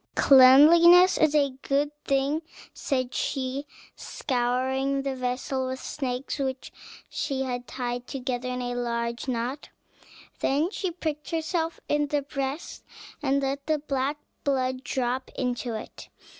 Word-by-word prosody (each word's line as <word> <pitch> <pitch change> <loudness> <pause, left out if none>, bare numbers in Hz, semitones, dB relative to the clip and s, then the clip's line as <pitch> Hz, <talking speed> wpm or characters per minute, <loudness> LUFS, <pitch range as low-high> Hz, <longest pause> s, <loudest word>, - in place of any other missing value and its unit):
"Cleanliness 330 +7 +7
is 310 -1 +3
a 285 -2 +3
good 285 +1 0
thing," 275 +3 +1 0.3
said 255 -3 -2
she, 270 +1 -2 0.3
scouring 265 +2 -1
the 275 -1 -2
vessel 255 +1 -2
with 260 0 -4
snakes, 260 +1 -4
which 265 -1 -3 0.4
she 275 -2 -2
had 245 -1 -4
tied 245 -1 -4
together 255 -2 -3
in 250 0 -3
a 245 0 -3
large 235 0 -3
knot; 250 +3 -3 0.7
then 300 +7 +1
she 385 -4 -2
pricked 315 -3 -4
herself 330 0 -2
in 295 0 +1
the 290 0 -1
breast, 275 +2 -5 0.4
and 275 +1 +1
let 275 +1 -3
the 310 -1 +2
black 285 0 -2 0.3
blood 260 -2 0
drop 250 +1 -2
into 245 -2 -2
it. 220 - -9
270 Hz, 130 wpm, -26 LUFS, 255-290 Hz, 0.7 s, Cleanliness